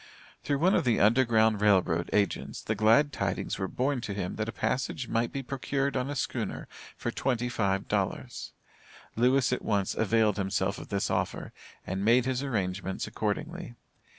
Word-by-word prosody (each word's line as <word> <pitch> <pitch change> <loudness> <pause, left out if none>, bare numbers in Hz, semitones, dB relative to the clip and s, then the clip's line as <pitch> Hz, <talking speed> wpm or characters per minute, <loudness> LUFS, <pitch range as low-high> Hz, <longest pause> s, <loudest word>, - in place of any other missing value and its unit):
Through 145 - 0
one 180 +7 +3
of 170 - +3
the 120 -4 +2
Underground 110 -1 +4
Rail 105 -2 +6
Road 85 -1 -2
Agents 100 -1 0
the 110 - -1
glad 115 +8 +4
tidings - - -2
were 95 - -1
borne 130 +4 -1
to 100 -3 -4
him 95 -3 -3
that 110 +1 -2
a - - -2
passage 125 +2 -2
might 115 +1 0
be 135 - -4
procured 140 +1 -2
on 130 +1 -1
a 145 - -3
schooner - - -3 0.3
for - - -3
twenty 125 -2 -1
five 100 -5 0
dollars. - - -2 0.6
Lewis 125 +2 +3
at - - -1
once 100 -3 0
availed 110 -1 +2
himself 95 0 -1
of - - -9
this 100 -1 -1
offer, - - -2 0.3
and 95 +1 -3
made 120 +3 +4
his 130 0 0
arrangements 95 -7 -2
accordingly. 135 - -3
115 Hz, 175 wpm, -29 LUFS, 100-130 Hz, 0.6 s, Rail